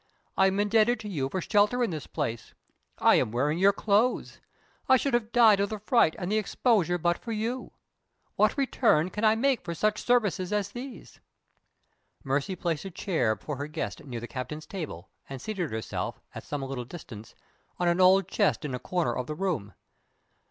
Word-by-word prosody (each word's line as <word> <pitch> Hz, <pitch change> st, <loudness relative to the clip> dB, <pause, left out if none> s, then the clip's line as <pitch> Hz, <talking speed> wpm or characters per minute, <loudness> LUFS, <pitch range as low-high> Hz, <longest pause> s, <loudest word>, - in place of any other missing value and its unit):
I 190 Hz, -, +4 dB
am 195 Hz, +1 st, 0 dB
indebted 220 Hz, +3 st, +3 dB
to 210 Hz, -, -7 dB
you 145 Hz, -9 st, -2 dB
for 185 Hz, -, -2 dB
shelter 210 Hz, +6 st, +2 dB
in 230 Hz, -, 0 dB
this 155 Hz, -5 st, -6 dB
place 115 Hz, -1 st, -4 dB, 0.4 s
I -, -, +5 dB
am -, -, 0 dB
wearing 145 Hz, +7 st, 0 dB
your 195 Hz, +2 st, +6 dB
clothes 215 Hz, +4 st, +1 dB, 0.5 s
I 260 Hz, -, +7 dB
should 275 Hz, +1 st, -1 dB
have 235 Hz, -2 st, 0 dB
died 225 Hz, -4 st, +6 dB
of 200 Hz, 0 st, +1 dB
the 215 Hz, -, -4 dB
fright 210 Hz, -5 st, +3 dB
and 180 Hz, +1 st, -4 dB
the 215 Hz, -, +3 dB
exposure 205 Hz, -5 st, +1 dB
but 175 Hz, 0 st, 0 dB
for 235 Hz, -, -7 dB
you. 230 Hz, +4 st, -3 dB, 0.6 s
What -, -, +2 dB
return 225 Hz, -, +2 dB
can 210 Hz, -, -4 dB
I 220 Hz, 0 st, +5 dB
make 265 Hz, +2 st, +1 dB
for 170 Hz, -, -5 dB
such 215 Hz, +4 st, 0 dB
services 205 Hz, -7 st, +1 dB
as 205 Hz, -2 st, 0 dB
these?" 250 Hz, +3 st, -9 dB, 1.0 s
Mercy 140 Hz, +6 st, -1 dB
placed 165 Hz, -3 st, -2 dB
a -, -, -4 dB
chair 160 Hz, -, 0 dB
for 145 Hz, +6 st, -6 dB
her 145 Hz, +2 st, -4 dB
guest 155 Hz, +1 st, -5 dB
near 125 Hz, -4 st, -6 dB
the 120 Hz, -, -7 dB
captain's 145 Hz, +5 st, -6 dB
table, 145 Hz, -, -7 dB, 0.2 s
and 135 Hz, -1 st, -6 dB
seated 180 Hz, -, -3 dB
herself, 110 Hz, 0 st, -4 dB
at -, -, -8 dB
some 145 Hz, -2 st, -4 dB
little 135 Hz, -2 st, -4 dB
distance, 115 Hz, -6 st, -11 dB, 0.4 s
on 175 Hz, -, 0 dB
an 175 Hz, +2 st, +2 dB
old 185 Hz, 0 st, +5 dB
chest 195 Hz, -5 st, +1 dB
in 140 Hz, -, -4 dB
a 125 Hz, -, -3 dB
corner 165 Hz, -4 st, -1 dB
of 125 Hz, -, -3 dB
the 150 Hz, -, -4 dB
room. 150 Hz, -, -2 dB
185 Hz, 195 wpm, -28 LUFS, 145-215 Hz, 1.0 s, I